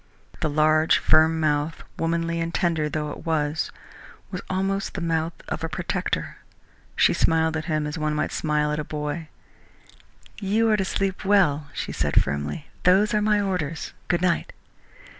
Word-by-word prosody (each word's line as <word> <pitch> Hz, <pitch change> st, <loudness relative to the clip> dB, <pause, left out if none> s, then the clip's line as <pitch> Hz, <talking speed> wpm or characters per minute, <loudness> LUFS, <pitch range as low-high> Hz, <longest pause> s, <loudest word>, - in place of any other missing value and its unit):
The 155 Hz, -, 0 dB
large, 155 Hz, +1 st, +4 dB
firm 160 Hz, +1 st, +4 dB
mouth, 150 Hz, 0 st, 0 dB, 0.2 s
womanly 165 Hz, 0 st, 0 dB
and 165 Hz, 0 st, -2 dB
tender 165 Hz, -4 st, 0 dB
though 150 Hz, -1 st, -3 dB
it -, -, -9 dB
was, 155 Hz, -2 st, 0 dB, 0.6 s
was 185 Hz, -, -4 dB
almost 195 Hz, +1 st, -1 dB
the -, -, -2 dB
mouth 165 Hz, -1 st, 0 dB
of 160 Hz, -, -4 dB
a 165 Hz, -, -1 dB
protector. 155 Hz, -, -2 dB, 0.6 s
She -, -, +4 dB
smiled 160 Hz, 0 st, +2 dB
at 160 Hz, -1 st, -3 dB
him 155 Hz, -3 st, 0 dB
as 150 Hz, +2 st, -4 dB
one 155 Hz, 0 st, 0 dB
might 150 Hz, -, -1 dB
smile 150 Hz, -1 st, 0 dB
at 150 Hz, -, -1 dB
a -, -, -1 dB
boy. 150 Hz, +2 st, -4 dB, 1.1 s
"You 220 Hz, +3 st, +2 dB
are 215 Hz, -, +4 dB
to 190 Hz, -, 0 dB
sleep 195 Hz, 0 st, -1 dB
well," 175 Hz, -8 st, +3 dB
she -, -, -4 dB
said 70 Hz, -1 st, +2 dB
firmly. 75 Hz, -, -3 dB, 0.2 s
"Those 200 Hz, +5 st, +4 dB
are 210 Hz, -, +2 dB
my 210 Hz, 0 st, +3 dB
orders. 165 Hz, -6 st, -2 dB
Good 175 Hz, 0 st, +1 dB
night!" 180 Hz, -2 st, +1 dB
160 Hz, 165 wpm, -24 LUFS, 150-180 Hz, 1.1 s, large